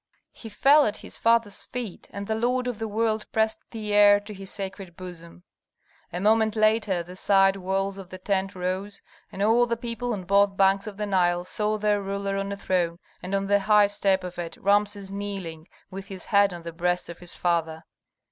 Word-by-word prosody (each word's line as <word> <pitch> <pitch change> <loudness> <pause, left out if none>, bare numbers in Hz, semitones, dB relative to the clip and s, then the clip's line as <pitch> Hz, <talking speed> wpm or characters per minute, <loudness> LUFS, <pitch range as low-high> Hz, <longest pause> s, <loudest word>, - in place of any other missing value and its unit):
He 225 - -10
fell 280 +7 +5
at 210 - -3
his - - -7
father's 230 -3 +2
feet, 240 -7 -7
and 200 0 -6
the 220 - -1
lord 245 +3 0
of 240 -3 -4
the 225 - -2
world 220 0 -1
pressed 220 0 +1
the 215 -2 -4
heir 205 0 +7
to 210 +1 -9
his 195 -1 -8
sacred 190 -3 -6
bosom. 175 -1 -10 0.7
A 175 - -4
moment 220 +2 +3
later 215 -4 +2
the 180 +2 -11
side 195 0 +4
walls 195 +1 -2
of 190 -2 -10
the 185 - -8
tent 195 +1 -1
rose, 185 +3 -4 0.3
and 195 - -3
all 235 +3 +4
the 235 0 -1
people 235 +1 -3
on 195 -3 -4
both 200 +1 +3
banks 195 +1 +3
of 205 -2 -7
the 210 - -2
Nile 175 -3 +1
saw 210 +3 -1
their 210 -1 +1
ruler 200 0 -3
on 195 0 -3
a 200 - -4
throne, 175 -3 0 0.2
and 185 +2 -3
on 195 0 0
the 205 +1 +3
high 210 +1 +5
step 195 -2 +1
of 180 -1 -7
it 170 -1 -6
Rameses 205 0 +1
kneeling, 195 -5 -6 0.2
with 195 +1 -7
his 190 -3 -8
head 200 -1 +4
on 175 -1 -8
the 170 0 -7
breast 175 +1 -1
of 170 - -9
his 175 -1 -4
father. 165 -2 -1
200 Hz, 205 wpm, -25 LUFS, 185-210 Hz, 0.7 s, heir